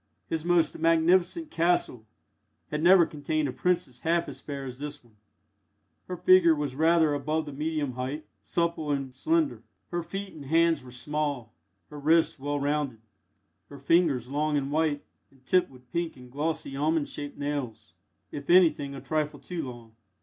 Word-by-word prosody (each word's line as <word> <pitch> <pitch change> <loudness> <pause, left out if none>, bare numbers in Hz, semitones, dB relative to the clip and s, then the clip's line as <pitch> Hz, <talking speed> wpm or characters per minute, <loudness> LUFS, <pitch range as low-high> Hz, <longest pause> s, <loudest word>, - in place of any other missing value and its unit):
His 160 -1 -2
most 170 -3 +2
magnificent 175 - +3
"castle" 165 -9 0 0.6
had 150 0 -1
never 175 +1 +7
contained 155 0 -2
a - - -2
princess 150 -7 -1
half 170 +4 +1
as - - -8
fair 140 -2 -6
as 125 0 -8
this 145 -1 -6
one. 115 -3 -25 0.9
Her 180 - -4
figure 175 -2 +6
was 145 -3 -3
rather 160 0 +4
above 155 +3 -1
the 145 - -7
medium 150 -1 -2
height, 130 +5 -4 0.2
supple 170 -3 -1
and 135 -2 -2
slender. 320 - 0 0.3
Her 175 0 -1
feet 195 +3 -6
and 145 -3 -10
hands 165 0 +3
were 130 - -12
small, 135 -1 -3 0.4
her 150 - -8
wrists 160 +1 +3
well 145 +1 -2
rounded, 140 -5 -1 0.7
her 140 - -10
fingers 140 -4 +2
long 150 +2 0
and 140 0 -2
white, 155 -1 +1 0.3
and 135 -1 -26
tipped 185 +4 +3
with 125 -2 -18
pink 170 -2 -2
and 125 -1 -13
glossy 145 -1 -2
almond 150 +1 +1
shaped 145 -1 -7
nails 130 - -4 0.4
if 140 -1 -7
anything 155 -6 +4
a 135 - -7
trifle 155 -1 -2
too 175 -2 -5
long. 120 -2 -12
150 Hz, 165 wpm, -28 LUFS, 140-165 Hz, 0.9 s, never